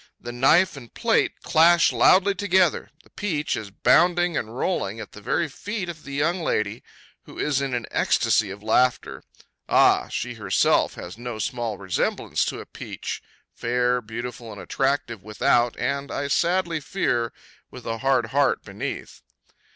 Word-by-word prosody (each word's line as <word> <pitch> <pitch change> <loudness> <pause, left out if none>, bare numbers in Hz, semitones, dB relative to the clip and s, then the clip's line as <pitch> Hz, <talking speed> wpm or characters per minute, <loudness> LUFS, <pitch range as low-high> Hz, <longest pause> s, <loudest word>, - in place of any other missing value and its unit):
The 120 - -7
knife 150 +9 +3
and 120 -5 -11
plate - - 0
clash 170 +2 +5
loudly 195 +2 +5
together; 185 -4 +1
the - - -24
peach 155 -8 -2
is 105 - -6
bounding 175 - +3
and 115 -1 -4
rolling 115 - -2
at 110 - -8
the 105 - -12
very 130 +9 0
feet 200 +5 -5
of 165 -2 -8
the 140 - -9
young 165 +6 0
lady, 110 -7 -1 0.4
who - - -13
is 140 -2 0
in 135 -2 -2
an 120 -2 -3
ecstasy 105 -3 +2
of 100 +2 -9
laughter. 125 +3 +1 0.5
Ah! - - +4
she - - -4
herself - - +1
has 90 +6 -9
no 120 -2 -5
small 120 -3 -3
resemblance 95 -2 -1
to - - -4
a - - -8
peach, - - -7 0.3
fair, 125 +1 0
beautiful, 115 +1 -7
and 100 - -9
attractive 135 -5 -1
without, 120 +3 +1
and, 140 0 -2
I 140 0 -3
sadly 170 +1 +1
fear, 120 -8 -1 0.4
with 125 - -12
a 115 0 -3
hard 135 -1 +1
heart 140 -1 +2
beneath. - - -6
130 Hz, 160 wpm, -24 LUFS, 115-165 Hz, 0.5 s, clash